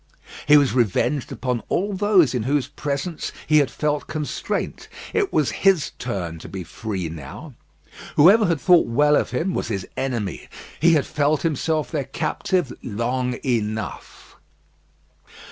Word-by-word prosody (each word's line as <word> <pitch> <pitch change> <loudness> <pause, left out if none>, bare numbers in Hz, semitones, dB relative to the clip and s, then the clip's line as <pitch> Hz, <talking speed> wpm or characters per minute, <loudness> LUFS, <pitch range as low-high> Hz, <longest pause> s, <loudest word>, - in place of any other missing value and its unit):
He 150 0 +8
was 140 -3 +3
revenged 125 +3 +1
upon 125 -3 -2
all 200 +3 0
those 190 -7 +3
in 125 - 0
whose 140 +4 0
presence 145 +3 -4
he 155 0 +5
had 140 -4 +2
felt 150 +3 -2
constraint. 155 -2 -3 0.3
It 405 -3 +1
was 150 -4 +1
his 190 -7 +3
turn 90 -9 -4
to - - -10
be 95 -2 -6
free 95 0 -4
now. 80 - -9 0.6
Whoever 195 +8 +6
had 165 -3 +1
thought 180 0 +5
well 145 +5 +3
of - - +1
him 180 +3 -1
was - - -2
his 100 -4 -3
enemy. 120 - -3 0.3
He 170 +1 +5
had 150 -3 +2
felt 150 0 0
himself 155 -1 -1
their 145 -4 -2
captive 165 +3 -1
long 125 +2 -2
enough. 110 -4 -3
140 Hz, 145 wpm, -22 LUFS, 115-160 Hz, 0.6 s, He